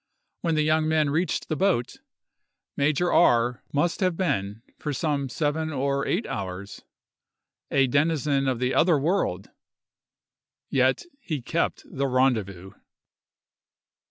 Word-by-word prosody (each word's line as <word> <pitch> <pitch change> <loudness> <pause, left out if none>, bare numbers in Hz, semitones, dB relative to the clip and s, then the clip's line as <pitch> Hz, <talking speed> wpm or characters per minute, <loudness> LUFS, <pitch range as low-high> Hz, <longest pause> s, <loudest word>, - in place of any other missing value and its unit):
When 165 -2 0
the 155 - +2
young 155 +1 +2
men 155 -2 +2
reached 165 +5 -1
the 155 - -1
boat, 180 -9 0 0.8
Major 155 +5 +1
R—— 120 -6 +3
must 165 +4 0
have 185 -3 +1
been, 105 - -2 0.2
for 150 - -3
some 140 -1 -1
seven 155 +4 -1
or 140 0 -1
eight 200 +7 0
hours, 100 0 -6 0.9
a 135 -1 +3
denizen 140 0 +1
of 130 -2 +1
the 125 +1 0
other 170 -2 +4
world, 140 - -1 1.2
yet 130 0 +2 0.2
he 155 - -4
kept 165 +7 -2
the 140 0 -2
rendezvous! 110 -8 0
140 Hz, 125 wpm, -25 LUFS, 125-160 Hz, 1.2 s, other